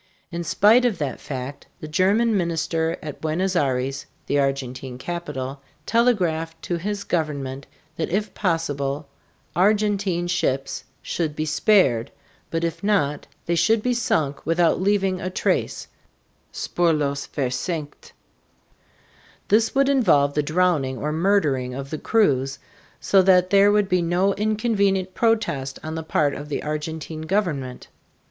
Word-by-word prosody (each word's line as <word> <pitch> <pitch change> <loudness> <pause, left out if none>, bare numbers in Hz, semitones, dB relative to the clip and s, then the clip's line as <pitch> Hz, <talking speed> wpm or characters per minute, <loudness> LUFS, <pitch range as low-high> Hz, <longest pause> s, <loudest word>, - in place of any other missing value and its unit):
In 170 0 -3
spite 210 +9 +5
of 240 -5 +1
that 145 -4 -3
fact, 135 0 -6
the 155 - -7
German 205 +8 +2
minister 165 -2 0
at 150 -2 -7
Buenos 180 +4 -1
Aires 135 -2 0 0.2
(the 145 - +1
Argentine 130 -2 -2
capital) 140 -3 -5 0.2
telegraphed 175 -9 +1
to 175 - -2
his 200 +3 -3
government 140 -6 -3 0.3
that 165 - -2
if 205 +2 -1
possible 145 -5 -1 0.5
Argentine 200 -2 +2
ships 135 -6 -1 0.2
should 155 -3 -2
be 155 - -2
spared, 155 - +3 0.4
but 165 0 -2
if 165 +1 -3
not, 195 -9 +1 0.2
they 170 - 0
should 210 +6 +3
be 250 - +1
sunk 155 - 0
without 165 +2 +2
leaving 195 -2 +1
a 185 - -2
trace 185 - -1 0.6
("spurlos 150 -5 0
versenkt)." 145 +4 -4 1.4
This 220 +4 +3
would 275 0 +4
involve 170 - +3
the 150 - +1
drowning 155 -4 +1
or 150 +4 -2
murdering 150 -8 +1
of 135 0 -6
the 155 - -3
crews, 135 - +1 0.4
so 195 - +4
that 185 -1 +4
there 200 0 +6
would 205 -1 +3
be 180 -1 +2
no 180 +4 +2
inconvenient 200 -3 0
protest 175 - 0
on 155 0 -5
the 160 - -3
part 150 -2 +1
of 145 +2 -7
the 145 - -3
Argentine 155 +1 -4
government. 160 -8 -2
165 Hz, 135 wpm, -23 LUFS, 145-195 Hz, 1.4 s, there